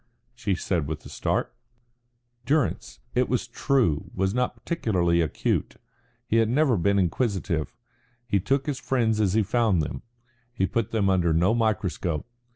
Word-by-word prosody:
she 115 Hz, -5 st, -1 dB
said 85 Hz, -5 st, -1 dB
with 80 Hz, 0 st, -5 dB
a -, -, -9 dB
start. -, -, -1 dB, 0.9 s
Durrance, 150 Hz, -1 st, 0 dB
it 125 Hz, 0 st, +1 dB
was 125 Hz, -1 st, 0 dB
true, 120 Hz, -, +1 dB
was 95 Hz, +1 st, 0 dB
not 125 Hz, 0 st, 0 dB
particularly 95 Hz, -, 0 dB
acute; 80 Hz, -, -1 dB, 0.5 s
he 115 Hz, -, +1 dB
had 115 Hz, -1 st, +3 dB
never 135 Hz, 0 st, +3 dB
been 100 Hz, +2 st, +2 dB
inquisitive; 95 Hz, -, -1 dB, 0.5 s
he 100 Hz, -4 st, +1 dB
took 135 Hz, +8 st, 0 dB
his 145 Hz, -3 st, -2 dB
friends 110 Hz, -4 st, +1 dB
as 95 Hz, -3 st, +2 dB
he 110 Hz, -, +4 dB
found 110 Hz, -3 st, +2 dB
them; -, -, -5 dB, 0.5 s
he 105 Hz, -6 st, 0 dB
put 115 Hz, +1 st, -1 dB
them 110 Hz, -3 st, +1 dB
under 90 Hz, -4 st, +2 dB
no 90 Hz, +7 st, +3 dB
microscope. 100 Hz, -8 st, -1 dB
110 Hz, 155 wpm, -26 LUFS, 90-120 Hz, 0.9 s, he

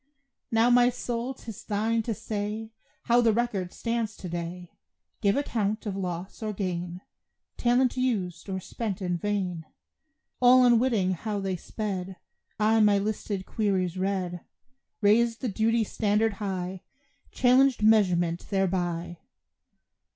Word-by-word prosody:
Now, 230 Hz, 0 st, +3 dB
my 245 Hz, 0 st, +6 dB
soul, 245 Hz, +1 st, -3 dB
'tis 225 Hz, -4 st, -9 dB
thine 220 Hz, +2 st, 0 dB
to 225 Hz, 0 st, -3 dB
say 215 Hz, +2 st, -4 dB, 0.3 s
How 240 Hz, 0 st, +4 dB
the 230 Hz, -1 st, +4 dB
record 210 Hz, -6 st, -1 dB
stands 230 Hz, -2 st, -2 dB
to 185 Hz, -, -7 dB
day 175 Hz, +1 st, -5 dB, 0.5 s
Give 200 Hz, +3 st, +3 dB
account 220 Hz, -6 st, -1 dB
of 200 Hz, -2 st, -3 dB
loss 180 Hz, 0 st, -5 dB
or 215 Hz, -1 st, -2 dB
gain, 180 Hz, -2 st, -4 dB, 0.5 s
Talent 245 Hz, +1 st, +2 dB
used 200 Hz, -9 st, -2 dB
or 190 Hz, 0 st, -2 dB
spent 205 Hz, +1 st, -4 dB
in 180 Hz, -2 st, -1 dB
vain. 185 Hz, -4 st, -2 dB, 0.8 s
All 250 Hz, 0 st, +7 dB
unwitting 235 Hz, -5 st, +3 dB
how 205 Hz, +3 st, -3 dB
they 195 Hz, -1 st, -2 dB
sped 190 Hz, 0 st, -4 dB, 0.4 s
I 220 Hz, +1 st, +4 dB
my 210 Hz, -2 st, +5 dB
listed 200 Hz, -1 st, -3 dB
queries 190 Hz, -5 st, 0 dB
read; 185 Hz, -2 st, -2 dB, 0.6 s
Raised 230 Hz, +3 st, +3 dB
the 255 Hz, -, -1 dB
duty 225 Hz, +3 st, +2 dB
standard 215 Hz, +1 st, +1 dB
high, 185 Hz, -2 st, -3 dB, 0.5 s
Challenged 255 Hz, -1 st, +3 dB
measurement 180 Hz, -6 st, +3 dB
thereby. 175 Hz, -3 st, -1 dB
205 Hz, 130 wpm, -27 LUFS, 185-230 Hz, 0.8 s, All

